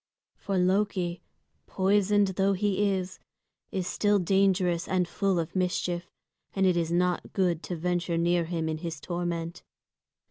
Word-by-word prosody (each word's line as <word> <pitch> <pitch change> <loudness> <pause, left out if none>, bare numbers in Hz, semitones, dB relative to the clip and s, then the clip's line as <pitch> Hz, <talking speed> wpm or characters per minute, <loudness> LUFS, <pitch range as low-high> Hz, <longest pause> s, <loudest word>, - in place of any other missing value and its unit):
For 195 -2 -3
Loki, 185 -1 +1 0.5
poisoned 200 +1 +2
though 195 +1 +1
he 205 +1 +1
is, 190 -1 -3 0.5
is 185 -2 -2
still 205 +2 +2
dangerous 185 -2 +2
and 185 -2 +1
full 195 +2 0
of 165 +1 -3
mischief, 180 -1 -1 0.5
and 195 -1 +2
it 185 -2 +4
is 165 -1 0
not 180 +1 0
good 175 -4 +1
to 180 - -5
venture 175 0 -1
near 170 0 +2
him 165 -1 -2
in 155 0 -2
his 165 -3 -5
torment. 170 +1 -4
180 Hz, 145 wpm, -28 LUFS, 170-195 Hz, 0.5 s, it